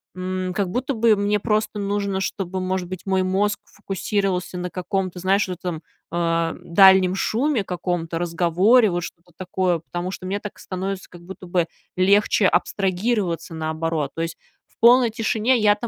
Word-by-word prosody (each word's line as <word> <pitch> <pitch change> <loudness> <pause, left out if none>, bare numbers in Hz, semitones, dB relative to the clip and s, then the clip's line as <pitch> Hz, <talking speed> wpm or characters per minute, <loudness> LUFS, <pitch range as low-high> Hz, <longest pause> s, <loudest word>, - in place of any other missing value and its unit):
м, 185 0 -3
как 195 -3 0
будто 260 +5 -2
бы 225 -1 +4
мне 205 +1 +1
просто 215 0 -1
нужно, 200 -1 -1
чтобы, 190 -1 -3
может 185 -1 -2
быть, 185 -1 -7
мой 190 -1 +1
мозг 200 +2 0
фокусировался 195 -2 -2
на 180 0 -4
каком-то, 185 +1 -3
знаешь, 195 +3 +2
в - - -5
этом, 175 -3 -5 0.3
э, 165 -1 0
дальнем 185 +1 +6
шуме, 235 +5 0
каком-то 175 -2 -3
разговоре, 175 +7 +3
вот 175 -1 -1
что-то 175 +1 -10
такое. 185 -1 0
Потому 175 +2 -5
что 185 0 -7
мне 195 +2 -2
так 210 0 -8
становится 190 +1 -5
как 175 - -13
будто 185 +1 -10
бы 175 -1 0 0.3
легче 200 +2 +4
абстрагироваться, 185 -1 0
наоборот. 160 -2 -2
То 165 - -2
есть 165 - -5 0.3
в - - -34
полной 240 0 +6
тишине 225 +2 +1
я-то 210 +2 +2
185 Hz, 165 wpm, -22 LUFS, 175-205 Hz, 0.3 s, дальнем